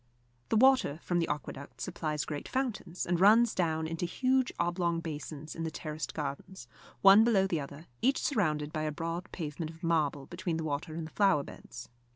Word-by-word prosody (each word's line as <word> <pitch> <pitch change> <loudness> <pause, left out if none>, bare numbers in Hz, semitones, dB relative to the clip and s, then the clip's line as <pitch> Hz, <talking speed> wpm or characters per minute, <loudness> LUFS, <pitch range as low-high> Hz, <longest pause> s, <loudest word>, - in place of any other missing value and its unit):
The 225 - +3
water 260 - +4
from 175 -1 0
the 165 - 0
aqueduct 140 -1 -6
supplies 150 -2 -3
great 150 -2 -5
fountains, 215 -9 -2
and 175 -1 0
runs 220 +4 +6
down 160 -3 0
into 165 +2 -2
huge 260 +6 +1
oblong 170 -1 0
basins 155 -2 -6
in 165 - -5
the 165 - -1
terraced 155 0 -5
gardens, 150 +6 -5 0.4
one 200 +2 +9
below 215 -5 +4
the 175 -4 0
other, 140 +3 -9 0.2
each 265 +3 +3
surrounded 155 - 0
by 155 - -1
a 155 0 -1
broad 165 +3 -4
pavement 155 -1 -4
of 165 +2 -13
marble 150 -4 +1
between 175 0 -3
the 165 - -3
water 155 +1 -3
and 165 -1 -4
the 155 - -10
flower 195 -8 +3
beds. 120 -3 -10
165 Hz, 190 wpm, -31 LUFS, 155-190 Hz, 0.4 s, one